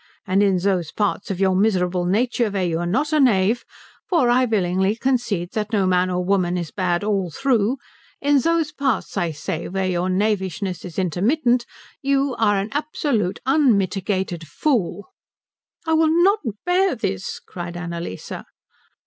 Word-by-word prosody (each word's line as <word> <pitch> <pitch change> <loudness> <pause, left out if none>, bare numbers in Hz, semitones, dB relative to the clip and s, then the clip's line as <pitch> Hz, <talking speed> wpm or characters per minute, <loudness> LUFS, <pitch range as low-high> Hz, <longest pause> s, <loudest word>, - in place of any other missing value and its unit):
And 190 0 +2
in 195 -2 +3
those 180 -3 0
parts 205 -1 -1
of 190 -2 -3
your 190 -1 +3
miserable 185 -3 +1
nature 235 +4 +1
where 195 -2 -1
you 165 -1 -1
are 175 - -2
not 285 - 0
a 305 - +4
knave 225 -3 +3 0.5
for 290 -10 +3
I 255 +1 +4
willingly 190 -2 +1
concede 230 -8 -1
that 210 0 -3
no 200 -4 +2
man 185 0 +2
or 180 0 -1
woman 180 -2 +1
is 170 -3 -4
bad 180 -1 0
all 200 -4 0
through 245 - +1 0.4
in 285 0 +3
those 330 +1 +1
parts, 275 -5 -1
I 175 -4 0
say, 155 +1 -4
where 190 +1 -2
your 180 0 0
knavishness 190 -2 -1
is 175 -3 -9
intermittent, 235 - +1 0.3
you 275 -1 +1
are 205 -2 +3
an 195 +2 -2
absolute, 280 - -1
unmitigated 195 - +1
fool." 205 - -1 0.7
"I 320 - +1
will 320 0 +4
not 400 +3 +4 0.3
bear 365 -1 +2
this," 195 -4 -3
cried 175 -1 -7
Annalise. 170 - -6
200 Hz, 155 wpm, -22 LUFS, 180-250 Hz, 0.7 s, a